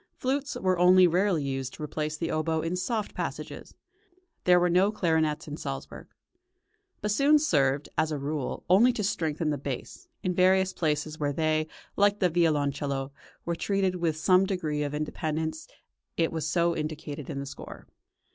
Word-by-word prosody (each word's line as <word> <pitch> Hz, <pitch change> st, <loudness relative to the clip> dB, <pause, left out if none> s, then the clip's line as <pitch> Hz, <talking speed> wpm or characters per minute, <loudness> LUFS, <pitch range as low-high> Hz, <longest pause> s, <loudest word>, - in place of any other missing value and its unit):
Flutes 280 Hz, +2 st, -1 dB
were 185 Hz, -2 st, 0 dB
only 180 Hz, +1 st, +7 dB
rarely 180 Hz, -2 st, +2 dB
used 135 Hz, -2 st, -3 dB
to -, -, -8 dB
replace 155 Hz, +1 st, -3 dB
the 165 Hz, +1 st, -2 dB
oboe 160 Hz, 0 st, 0 dB
in 165 Hz, +2 st, -1 dB
soft 210 Hz, +3 st, -2 dB
passages; -, -, -6 dB, 0.7 s
there 180 Hz, 0 st, +6 dB
were 175 Hz, -, +3 dB
no 185 Hz, +4 st, +3 dB
clarinets 160 Hz, -6 st, 0 dB
in 150 Hz, 0 st, -6 dB
Salzburg. 135 Hz, -3 st, -6 dB, 1.0 s
Bassoons 285 Hz, +8 st, +3 dB
served, 140 Hz, -, +2 dB
as 160 Hz, 0 st, +1 dB
a 150 Hz, -, -1 dB
rule, 145 Hz, 0 st, -3 dB
only 210 Hz, +8 st, +6 dB
to 210 Hz, -, -3 dB
strengthen 160 Hz, -5 st, -1 dB
the 145 Hz, -, -2 dB
bass; 140 Hz, -, -6 dB, 0.2 s
in 185 Hz, -2 st, 0 dB
various 185 Hz, +1 st, +3 dB
places 155 Hz, -1 st, -1 dB
where 145 Hz, -1 st, 0 dB
they, 155 Hz, 0 st, +1 dB, 0.3 s
like 205 Hz, 0 st, +4 dB
the 180 Hz, -4 st, +2 dB
violoncello, 145 Hz, -4 st, 0 dB, 0.3 s
were 170 Hz, -, -1 dB
treated 190 Hz, 0 st, 0 dB
with 165 Hz, -3 st, -1 dB
some 185 Hz, +3 st, +4 dB
degree 155 Hz, -6 st, -2 dB
of 145 Hz, 0 st, -2 dB
independence 155 Hz, +1 st, -3 dB, 0.5 s
it 165 Hz, -1 st, +1 dB
was 160 Hz, -1 st, -2 dB
so 170 Hz, +1 st, +2 dB
indicated 150 Hz, -2 st, -5 dB
in 140 Hz, -, -4 dB
the 140 Hz, -, -4 dB
score. 140 Hz, +1 st, -10 dB
160 Hz, 165 wpm, -28 LUFS, 150-185 Hz, 1.0 s, only